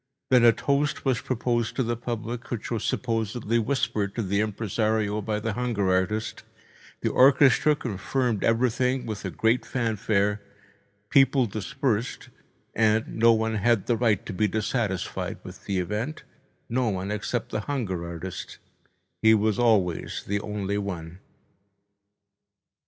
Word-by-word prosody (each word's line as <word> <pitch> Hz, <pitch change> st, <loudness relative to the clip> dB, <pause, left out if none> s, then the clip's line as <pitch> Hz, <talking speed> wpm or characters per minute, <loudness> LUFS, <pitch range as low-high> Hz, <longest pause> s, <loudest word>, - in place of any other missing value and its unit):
Then 125 Hz, -2 st, +6 dB
a 120 Hz, -, +8 dB
toast 140 Hz, +6 st, 0 dB
was 130 Hz, -4 st, +1 dB
proposed 120 Hz, -2 st, -1 dB
to 130 Hz, -, +1 dB
the 120 Hz, 0 st, -1 dB
public, 120 Hz, 0 st, -5 dB
which 115 Hz, -2 st, -4 dB
was 115 Hz, -3 st, -1 dB
supposedly 115 Hz, -1 st, -1 dB
whispered 110 Hz, -5 st, -1 dB
to 115 Hz, -, -1 dB
the 100 Hz, +1 st, 0 dB
impresario 110 Hz, 0 st, 0 dB
by 105 Hz, 0 st, -2 dB
the 110 Hz, 0 st, -2 dB
hunger 105 Hz, -5 st, 0 dB
artist, 105 Hz, +4 st, -1 dB, 0.6 s
the -, -, 0 dB
orchestra 140 Hz, +2 st, +5 dB
confirmed 120 Hz, -1 st, -2 dB
everything 125 Hz, +2 st, +1 dB
with 110 Hz, -2 st, -5 dB
a -, -, -1 dB
great 115 Hz, +7 st, +1 dB
fanfare, 105 Hz, -3 st, 0 dB, 0.7 s
people 135 Hz, -1 st, +5 dB
dispersed, 110 Hz, +3 st, -2 dB, 0.4 s
and 110 Hz, 0 st, +1 dB
no 115 Hz, +1 st, +7 dB
one 110 Hz, 0 st, +1 dB
had 110 Hz, -1 st, +2 dB
the 120 Hz, -, +2 dB
right 110 Hz, -4 st, +1 dB
to -, -, -5 dB
be 105 Hz, +3 st, +1 dB
dissatisfied 105 Hz, -2 st, -2 dB
with -, -, -11 dB
the 100 Hz, -, -1 dB
event, 105 Hz, -, -3 dB, 0.4 s
no 120 Hz, 0 st, 0 dB
one 95 Hz, 0 st, -3 dB
except 105 Hz, +3 st, -3 dB
the 110 Hz, -, -1 dB
hunger 100 Hz, -12 st, -2 dB
artist—he 90 Hz, +5 st, -3 dB
was 110 Hz, 0 st, +1 dB
always 105 Hz, -8 st, +1 dB
the 100 Hz, +1 st, -1 dB
only 100 Hz, -1 st, -3 dB
one. 90 Hz, -3 st, -5 dB
110 Hz, 135 wpm, -26 LUFS, 100-120 Hz, 0.7 s, a